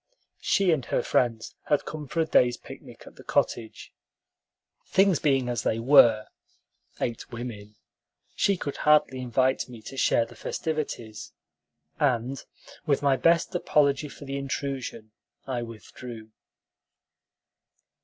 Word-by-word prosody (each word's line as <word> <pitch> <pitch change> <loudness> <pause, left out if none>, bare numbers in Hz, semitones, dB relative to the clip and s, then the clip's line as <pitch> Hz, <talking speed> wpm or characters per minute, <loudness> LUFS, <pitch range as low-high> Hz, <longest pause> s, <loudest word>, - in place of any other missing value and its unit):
She 195 -3 +2
and 150 -5 +1
her - - 0
friends 115 -3 0
had 150 - +2
come 150 -2 -6
for 165 - -1
a - - +2
day's 125 -5 +3
picnic - - -12
at - - -15
the - - -12
cottage. 110 -2 -2 0.9
Things 190 -4 +3
being 135 -4 +2
as 120 -3 -1
they 110 - 0
were 115 -3 +6 0.7
(eight 120 -2 -4
women), 110 -3 -7 0.6
she 200 -1 +2
could 140 -4 -5
hardly 150 -4 +3
invite 130 +2 +1
me 120 -2 -10
to 135 - -9
share 115 - +3
the - - -14
festivities, 140 -9 -4 0.7
and, 130 -1 0 0.4
with 145 -1 +1
my 140 -1 +4
best 165 +4 +2
apology 145 0 +2
for 145 - -11
the 135 0 -4
intrusion, 135 -5 -4 0.3
I 125 -3 -2
withdrew. 115 0 -10
130 Hz, 130 wpm, -26 LUFS, 115-145 Hz, 0.9 s, were